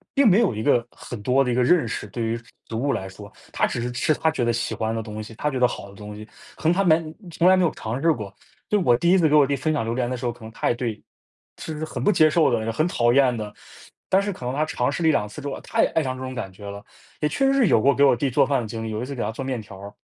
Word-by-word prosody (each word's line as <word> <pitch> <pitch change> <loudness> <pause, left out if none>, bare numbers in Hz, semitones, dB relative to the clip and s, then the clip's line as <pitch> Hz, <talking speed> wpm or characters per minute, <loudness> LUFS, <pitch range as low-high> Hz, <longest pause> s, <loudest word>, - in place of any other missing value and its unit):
并 275 -3 +5
没 205 +2 +6
有 125 - +2
一 110 - -3
个 120 -3 +3
很 120 -4 -9
多 130 +5 +3
的 125 - -1
一 - - +1
个 125 - +3
认 155 -1 +3
识， 105 - -4
对 115 +4 -4
于 115 +1 -1 0.3
食 - - -10
物 135 +5 0
来 95 - -3
说， 100 +2 -12 0.2
他 - - +2
只 - - -4
是 125 +1 -3
吃 120 - 0
他 160 - +1
觉 155 - -2
得 120 - +2
喜 115 - -2
欢 110 0 -2
的 115 - -3
东 110 -1 -7
西， 110 +1 -10
他 150 - -1
觉 130 - -2
得 125 - +5
好 100 - -7
的 - - -14
东 105 +1 -9
西， 105 +1 -9 0.3
可 - - -14
能 - - +4
他 190 - +1
完 160 -2 +2 0.2
从 170 +2 +2
来 185 - +7
没 185 - +3
有 165 - +3
尝 115 +4 -5
试 165 +1 +4
过。 105 -6 -7 0.4
就 210 - +3
是 - - -1
我 120 - +5
第 170 +7 +1
1 190 - +6
次 160 - +3
给 150 - +3
我 145 - +6
弟 140 - 0
分 155 +4 -1
享 150 - 0
榴 115 - -2
莲 120 -1 -1
的 130 - -3
时 120 - -6
候， 120 - 0
可 120 -1 -14
能 110 - -9
他 - - -1
也 - - +3
对 120 -3 -3 0.6
就 160 - -6
是 155 - -3
很 - - -5
不 210 - +4
接 155 -6 +5
受 155 -1 +3
的， 115 -1 0
很 155 +8 +1
讨 120 -8 +2
厌 130 -3 +4
的， 105 -2 -6 0.6
但 190 - +4
是 205 +1 -2
可 130 - -9
能 125 - -2
他 155 - +1
尝 130 -3 -1
试 155 - -4
了 160 - +4
1、2 105 -9 +1
次 125 +8 -9
之 145 - -5
后， 140 - -4
他 - - 0
也 - - +4
爱 160 - +3
上 130 -2 -3
这 - - -9
种 130 0 -6
感 95 - -5
觉 100 +2 -12
了， 100 0 -8 0.4
也 150 - +1
确 270 - 0
实 - - +2
是 270 -5 +3
有 110 - +4
过 140 +4 +4
给 140 - +3
我 140 - +6
弟 135 +3 -1
做 125 - +3
饭 135 -1 +1
的 115 - -5
经 110 +1 -5
历， 110 - -4
有 110 - -3
一 125 - -3
次 140 - -6
给 125 - -4
他 105 - -2
做 125 - -6
面 130 -3 -3
条 100 -2 -12
儿。 100 +1 -9
125 Hz, 365 characters per minute, -23 LUFS, 110-155 Hz, 0.6 s, 来